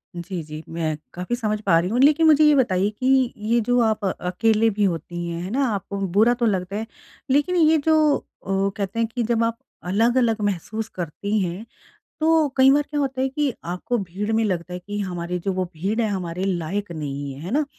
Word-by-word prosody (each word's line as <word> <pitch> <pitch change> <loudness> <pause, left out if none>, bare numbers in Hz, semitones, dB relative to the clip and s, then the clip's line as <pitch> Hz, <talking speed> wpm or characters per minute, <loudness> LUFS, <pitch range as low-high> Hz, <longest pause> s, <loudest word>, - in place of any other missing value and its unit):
जी, 175 0 -5
जी। 155 +1 -8
मैं 160 -2 -2 0.2
काफ़ी 180 +7 -3
समझ 215 -3 -1
पा 185 -5 +4
रही 180 - -1
हूँ। 240 +4 0
लेकिन, 300 +4 +5
मुझे 310 0 +6
ये 300 -1 +6
बताइए 200 -7 +2
कि 260 -1 +3
ये 225 +3 +1
जो 245 +3 +2
आप 220 -2 +1
अकेले 215 +5 +1
भी 210 -1 -1
होती 175 -1 -2
हैं, 170 0 -4
हैं 185 - -5
ना? 270 +3 +1
आपको 200 -2 -3 0.2
बुरा 230 +3 +6
तो 240 -1 -1
लगता 195 -2 -1
है, 220 +2 -3 0.5
लेकिन 295 +6 +2
ये 320 -1 +5
जो 310 -2 +4 0.3
अ, 195 +1 +1
कहते 200 +2 -3
हैं 230 - +2
कि 235 +1 -3
जब 230 0 +1
आप 230 0 -1 0.3
अलग-अलग 230 +1 +2
महसूस 205 +3 -2
करती 195 +5 -2
हैं। 185 +3 -3 0.5
तो 315 -1 +3
कई 265 0 +7
बार 290 +1 +4
क्या 295 0 -2
होता 265 -2 -1
है 265 - +2
कि 275 -2 -1
आपको 180 +8 -2
भीड़ 200 +3 -4
में 225 0 +2
लगता 180 -3 -2
है 180 - -4
कि 205 +3 -6
हमारे 180 -2 -3
जो 195 - +1
वो 185 0 -1
भीड़ 195 +8 -2
है 225 - +1
हमारे 180 -2 -3
लायक 190 +1 -2
नहीं 145 -3 -5
है। 135 - -11
है 180 - -6
ना? 285 - +2
अ, - - -2
210 Hz, 220 wpm, -23 LUFS, 180-245 Hz, 0.5 s, कई